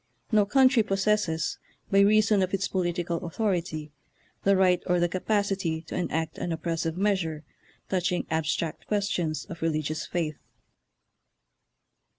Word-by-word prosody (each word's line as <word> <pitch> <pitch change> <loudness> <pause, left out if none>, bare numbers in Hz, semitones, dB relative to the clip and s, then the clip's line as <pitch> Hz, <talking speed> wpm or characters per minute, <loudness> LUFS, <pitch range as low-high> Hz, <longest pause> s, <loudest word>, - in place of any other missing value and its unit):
No 210 -2 +4
country 260 +1 +5
possesses, 195 -5 0 0.3
by 195 - +5
reason 210 0 +5
of 185 +1 +1
its 195 - -1
political 175 -2 -1
au 175 - -4
thority, 170 -6 -2 0.5
the 200 0 +4
right 180 -2 +4
or 180 -1 +2
the 175 - +3
capacity 190 -3 -1
to - - -7
enact 160 -3 -2
an 175 - -2
oppressive 165 0 -2
measure 185 -6 0 0.4
touching 180 -1 0
abstract 160 0 -1
questions 185 -6 -1
of 170 -4 -9
religious 155 -1 -1
faith." 160 -4 -2
180 Hz, 130 wpm, -27 LUFS, 160-200 Hz, 0.5 s, country